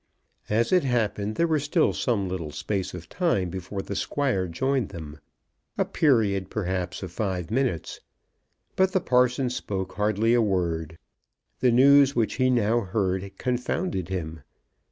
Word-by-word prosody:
As 115 +2 +1
it 180 -3 +4
happened, 110 -4 -1
there 170 - +2
was 155 -4 +1
still 155 +2 +2
some 105 -6 0
little 90 -4 -4
space 95 +5 -3
of 85 -1 -9
time 100 - 0
before 95 +2 -5
the 100 - -5
Squire 125 -10 0
joined 130 +7 -1
them, 75 -2 -9 0.6
a - - +2
period 105 -10 +2
perhaps 95 -2 -3
of 90 - -6
five 95 -2 -3
minutes. 120 -9 -1 0.8
But 190 0 +2
the 190 - +3
parson 125 -3 +2
spoke 95 -6 -4
hardly 105 +3 +1
a 120 - +4
word. 85 -6 -1 0.6
The 125 - +3
news 140 +3 +6
which 115 -2 0
he 130 -1 +3
now 120 -2 +2
heard 95 -2 -2
confounded 125 - -2
him. 80 -4 -4
105 Hz, 150 wpm, -26 LUFS, 95-130 Hz, 0.8 s, news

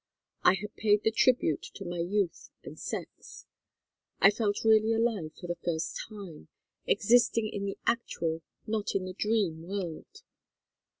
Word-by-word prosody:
I 185 - +6
had 210 +2 -7
paid 210 -1 +3
the 220 - +3
tribute 225 - +3
to 195 - -7
my 175 0 -4
youth 185 +1 -1
and - - -10
sex. - - -7 0.7
I 195 - +7
felt 205 -1 -1
really 220 0 +5
alive 225 -9 0
for - - -8
the 175 -1 -4
first 165 -1 -2
time, 190 - -10 0.4
existing 230 0 +4
in 200 -1 -4
the 195 - -4
actual 165 -8 -1 0.2
not 215 -2 -2
in 190 -1 0
the 185 - -5
dream 200 -6 0
world. 190 - -6
205 Hz, 145 wpm, -30 LUFS, 175-220 Hz, 0.7 s, I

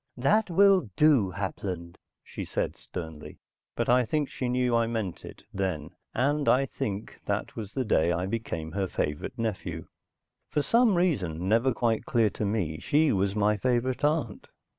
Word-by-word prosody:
"That 205 - +2
will 190 - +5
do, 145 -10 +4
Hapland!" 90 -2 -5 0.2
she - - -7
said - - -2
sternly. 80 -3 -8 0.4
But - - -1
I 125 +1 +5
think 145 +4 -1
she 125 - -3
knew 125 -1 +1
I 115 -1 +2
meant 110 -6 -3
it - - -11
then 95 -6 -2 0.2
and 145 +4 +2
I 135 +2 +4
think 105 -4 -5
that - - -2
was 105 -2 -7
the 130 -2 0
day 85 -5 +3
I 85 +1 -1
became 95 -7 -4
her 95 +2 -1
favorite 75 - -3
nephew. 110 -4 -3 0.6
For 150 - 0
some 230 0 +4
reason, 95 - 0
never 115 +5 +3
quite 115 -1 0
clear 115 -4 +3
to 105 - -3
me, 95 -7 -1
she 150 0 +3
was 100 0 +1
my 105 0 +2
favorite 125 +4 0
aunt. 145 -8 0
115 Hz, 165 wpm, -28 LUFS, 95-135 Hz, 0.6 s, will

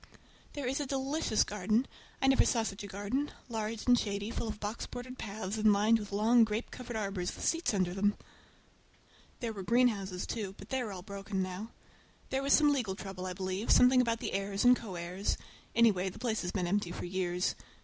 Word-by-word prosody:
There 285 -2 -4
is 265 +3 0
a 290 - -2
delicious 270 -2 +1
garden! 210 +5 0 0.4
I - - +5
never 270 0 +6
saw 230 -2 +2
such 200 -3 -4
a - - -5
garden—large 220 +1 -3
and 245 -1 +6
shady, 205 +1 -2
full 235 - -3
of 215 -1 -5
box 210 +2 -4
bordered 255 +1 -8
paths, 210 0 -4
and 215 0 +5
lined 215 +3 +4
with 205 -1 -7
long 225 +4 +5
grape 220 +1 -2
covered 245 -2 -7
arbors 195 -4 -2
with - - -5
seats 330 -6 +1
under 185 -4 0
them. 205 +2 +1 1.2
There 230 -2 -2
were 200 - -6
greenhouses, 200 -4 +1
too, 200 -4 -4
but - - -12
they 265 -1 0
are 225 -4 -4
all 185 -2 -7
broken 195 -1 -3
now. 185 +4 -5 0.6
There 265 - +1
was 275 +1 0
some 295 -1 +6
legal 225 -9 -1
trouble, 190 -2 -6
I 185 - -3
believe, 190 +3 -3
something 250 +1 +7
about 230 -2 0
the - - -3
heirs 195 +2 -1
and 250 0 +8
co 215 -7 -7
heirs; 180 +4 -2 0.4
anyhow, 205 -5 +4
the - - -11
place 225 -3 -1
has 175 - -3
been 185 -3 -1
empty 185 0 0
for - - -5
years. 180 0 0
210 Hz, 205 wpm, -32 LUFS, 195-240 Hz, 1.2 s, and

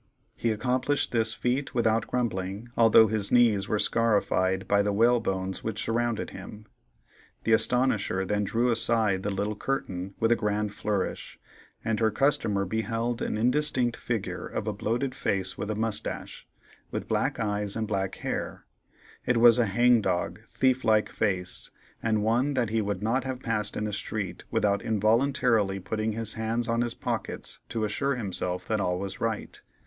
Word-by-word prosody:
He 115 - -1
accomplished 125 +6 0
this 115 -2 +2
feat 130 +3 -1
without 115 -2 +2
grumbling, 105 -2 -2
although 115 -1 +7
his 110 -2 +1
knees 115 -5 +4
were 105 - 0
scarified 100 -4 +1
by 100 0 +3
the 100 0 0
whalebones 100 -4 +1
which 110 -1 -2
surrounded 115 0 -1
him. 105 +3 -10 0.8
The 115 - +2
Astonisher 110 -5 +2
then 105 +1 0
drew 120 +5 +1
aside 110 -4 +2
the 105 - -2
little 100 +2 -2
curtain 95 -7 -3
with 115 +1 +2
a - - +6
grand 105 -1 -1
flourish, 100 -2 -3 0.5
and 110 -1 0
her 110 -1 +3
customer 110 -5 +1
beheld 115 +3 -2
an - - -1
indistinct 125 0 +1
figure 115 -4 -4
of - - -4
a 105 - -1
bloated 120 +6 -2
face 95 -6 -1
with 100 +1 -5
a 110 - -1
mustache, 110 0 -3 0.4
with - - -4
black - - 0
eyes 105 -2 -1
and 110 -1 -2
black 95 -2 -2
hair; - - -4 0.6
it 120 - +1
was 115 0 +7
a 120 - +3
hang 120 +3 +4
dog, 90 -2 -1
thief 130 -1 +1
like 110 -1 +3
face, 95 -3 +1 0.3
and 110 -2 +1
one 125 +6 +1
that 120 -4 0
he 110 0 +1
would 100 -1 -3
not 120 +4 +1
have 130 -1 -4
passed 110 -4 -2
in - - -2
the 105 -1 -3
street 100 -2 -4
without 100 0 +1
involuntarily 110 -2 +2
putting 110 +3 -2
his 110 -1 -1
hands 115 +1 -1
on 115 0 +1
his 120 -1 -2
pockets - - -3
to 115 -2 -2
assure 135 +6 0
himself 90 -5 -3
that 110 -2 0
all 90 -1 0
was 95 0 -6
right. 115 -2 -3
110 Hz, 165 wpm, -27 LUFS, 100-120 Hz, 0.8 s, although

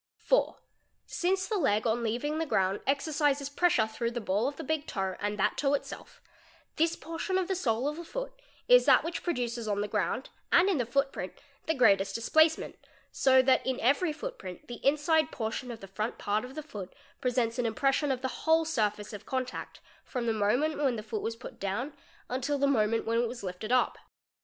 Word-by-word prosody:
4. - - +1 0.5
Since 375 +1 0
the 425 -3 0
leg 215 - +2
on 230 +1 +1
leaving 245 +7 -1
the 325 - 0
ground 190 -5 +1
exercises 285 0 +1
'pressure 285 -6 +3
through 225 +2 -3
the 240 0 -4
ball 210 +2 0
of 285 - -3
the - - -7
big 310 +1 -2
toe 190 -2 -2
and 205 0 -2
that 200 - +1
toe 285 0 +2
itself, 280 - -8 0.5
this 330 +1 +2
portion 330 +4 -3
of 370 -2 0
the 385 - 0
sole 255 -8 0
of 300 +1 -2
the 340 - -6
foot - - -5 0.3
is - - +7
that - - +6
which 335 +1 -4
produces 240 -8 -2
on 205 -1 0
the 205 - -1
ground 210 +4 -2 0.2
and 360 +3 +6
in 360 -8 +1
the 240 - -1
footprint 270 -7 -1 0.3
the 320 - +1
greatest 195 -6 +4
displacement, 315 +8 +2 0.3
so 260 -1 +5
that 260 0 +4
in 260 -1 -1
every 285 +8 +2
footprint 190 - -7
the 240 - -8
inside 305 +2 +3
portion 225 +1 -4
of 230 -2 -7
the 195 - -9
front 215 +4 -3
part 210 +1 -1
of 255 +2 -9
the 310 - -5
foot 205 - -8 0.3
presents 245 -2 0
an 240 - +1
impression 275 +5 +1
of 260 0 -3
the 260 - -4
whole 320 0 +5
surface 210 -8 -1
of 205 - -9
contact 255 -1 -4 0.2
from 250 -3 -4
the 225 - +1
moment 245 +9 +1
when 270 -4 +2
the 215 - -5
foot 215 0 -4
was 225 - -3
put 230 - -11
down 230 +9 -2 0.3
until 260 +3 -1
the 280 - +2
moment 230 -5 +2
when 230 +1 +1
it 240 - +1
was 235 -1 -7
lifted 190 +4 -5
up. 255 - +2
255 Hz, 205 wpm, -30 LUFS, 220-300 Hz, 0.5 s, is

